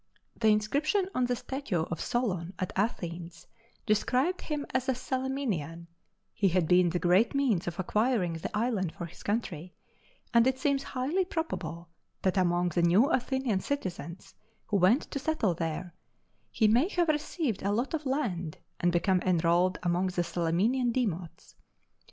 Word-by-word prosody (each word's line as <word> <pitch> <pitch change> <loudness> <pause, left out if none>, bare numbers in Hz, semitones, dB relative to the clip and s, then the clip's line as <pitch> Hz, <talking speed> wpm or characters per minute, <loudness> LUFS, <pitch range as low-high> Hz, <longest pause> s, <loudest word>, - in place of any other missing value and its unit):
The 220 - +1
inscription 285 - +2
on 250 -1 +1
the 245 - 0
statue 245 - -2
of 170 0 -5
Solon 190 -7 -1
at 185 - -3
Athens 175 -5 -3 0.4
described 255 - +1
him 295 -2 -3
as 260 0 0
a 260 - +2
Salaminian; 255 - -3 0.5
he 200 - +2
had 180 -2 +2
been 180 0 +5
the 175 - -1
great 180 +9 +3
means 230 -11 +1
of 175 +1 -4
acquiring 210 -2 +1
the 165 +6 -4
island 210 -7 0
for 170 - -6
his 170 +1 -12
country, 185 -6 -3 0.6
and 235 +1 +5
it 260 0 +1
seems 280 0 +1
highly 275 +9 -1
probable 320 - -4 0.4
that 190 0 +2
among 175 -1 +2
the 170 +1 0
new 190 - +4
Athenian 260 -5 0
citizens, 185 - -5 0.3
who 205 - 0
went 195 - +4
to 280 - -2
settle 265 - 0
there, 165 +1 -4 0.6
he 220 - +2
may 240 +9 +4
have 350 -4 +1
received 300 - -1
a 200 - 0
lot 240 +8 -1
of 305 -3 -2
land 185 - -2 0.2
and 175 - +2
become 180 +1 +2
enrolled 175 +1 +2
among 175 +1 +1
the 180 -1 -1
Salaminian 190 +10 +1
demots. 185 -9 -3
205 Hz, 155 wpm, -29 LUFS, 175-260 Hz, 0.6 s, been